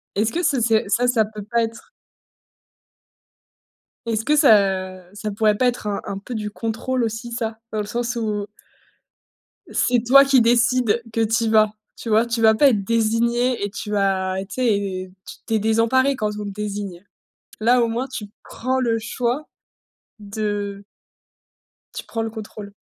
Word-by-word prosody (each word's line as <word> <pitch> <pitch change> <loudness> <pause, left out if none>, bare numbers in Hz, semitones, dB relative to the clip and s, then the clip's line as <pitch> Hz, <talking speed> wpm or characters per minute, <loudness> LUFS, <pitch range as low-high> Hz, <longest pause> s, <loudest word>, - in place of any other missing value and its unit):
Est-ce 215 +2 +1
que 350 +2 -2
ça 270 -6 +2
c'est 220 -1 +2
ça 240 +5 +2
ça 230 -3 +3
peut 210 -1 -9
pas 235 +2 0
être 225 0 -7 2.2
est-ce 225 -1 -1
que 300 +4 +2
ça, 195 - +3
ça 210 0 -4
pourrait 210 0 +2
pas 255 - +2
être 240 -3 -2
un 200 - -1
un 195 - -5
peu 235 +4 -7
du 210 -1 -4
contrôle 235 +3 -2
aussi 225 +1 -4
ça? 225 -1 -3
Dans 215 - -2
le 205 - -2
sens 240 +2 -2
où 210 -3 -2 1.3
c'est 245 -2 +1
toi 275 +3 +8
qui 270 -3 +5
décides 240 0 +3
que 225 - +1
tu 225 +1 +1
y - - +1
vas. 215 -1 +4 0.2
Tu 230 - -7
vois? 220 +2 +4
Tu 230 -1 -2
vas 220 0 +6
pas 285 +4 +5
être 205 -5 0
désigné 230 +2 +1
et 205 - -1
tu 210 +1 -7
vas 190 -2 0
tu - - -7
sais, 200 -6 -1 0.4
tu 225 - -2
es 220 - +3
désemparé 230 +5 +2
quand 215 -3 -1
on - - -4
te - - -4
désigne. 200 -2 -5 0.6
Là 245 +3 +4
au 230 - +1
moins 240 +4 -2
tu 235 -5 -6 0.2
prends 260 +2 -2
le 230 -2 +1
choix 245 +6 -2 0.7
de 205 -1 -4 1.1
tu - - -6
prends 225 -1 -4
le 225 - -3
contrôle. 210 -2 -9
225 Hz, 175 wpm, -22 LUFS, 210-240 Hz, 2.2 s, toi